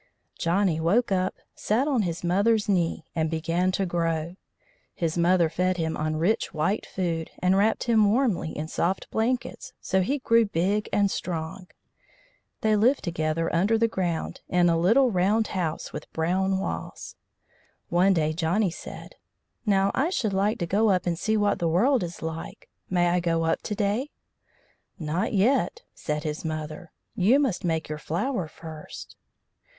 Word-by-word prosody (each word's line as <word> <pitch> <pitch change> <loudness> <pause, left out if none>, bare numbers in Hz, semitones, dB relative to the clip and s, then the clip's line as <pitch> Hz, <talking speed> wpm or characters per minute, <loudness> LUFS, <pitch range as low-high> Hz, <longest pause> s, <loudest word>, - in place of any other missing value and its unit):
Johnny 170 -1 +1
woke 200 +9 +2
up, 185 0 0 0.2
sat 240 +7 0
on 265 -6 +2
his 175 -3 -3
mother's 205 +5 +2
knee, 175 -5 0
and 160 -1 0
began 165 +3 0
to 195 - 0
grow. 165 -1 -1 0.6
His 165 -2 -1
mother 175 0 +3
fed 180 +3 0
him 160 -1 -1
on 155 0 -1
rich 180 +3 0
white 175 +8 0
food, 165 -3 -2
and 185 +1 +2
wrapped 210 +3 +2
him 220 -4 +4
warmly 225 -9 +1
in 155 0 -5
soft 175 +4 -2
blankets, 240 +3 -2
so 190 0 +1
he 270 +10 0
grew 230 -3 +3
big 200 +2 0
and 200 -1 +2
strong. 170 +1 -4 0.9
They 215 -1 +3
lived 240 +7 +3
together 165 -1 -1
under 200 +7 +3
the 230 +1 +3
ground, 175 -6 -3
in 175 -1 +3
a 165 -1 +2
little 235 +9 +4
round 205 +4 +2
house 170 -5 -3
with - - -8
brown 190 +4 +1
walls. 190 - -5 0.7
One 185 +3 +4
day 155 -1 +1
Johnny 175 +4 +1
said: - - -10 0.5
"Now, 195 -1 +3
I 285 +6 +1
should 220 - -1
like 200 +3 +1
to 175 - -2
go 210 +6 +2
up 185 -2 +2
and 175 -1 0
see 220 0 +1
what 205 -1 +1
the 170 - +1
world 235 - +3
is 175 -2 -6
like. 160 0 -6 0.2
May 175 -1 +2
I 180 +1 +2
go 165 -1 0
up 165 - 0
to 210 - -4
day?" 210 +7 0 0.9
"Not 165 +6 -2
yet," 255 - +2
said 150 -1 -3
his 155 -1 -4
mother. 155 +1 -5 0.2
"You 220 +9 +4
must 255 -11 0
make 160 -2 -1
your 150 0 -5
flower 180 - -2
first." 155 -1 -10
185 Hz, 165 wpm, -26 LUFS, 165-210 Hz, 0.9 s, him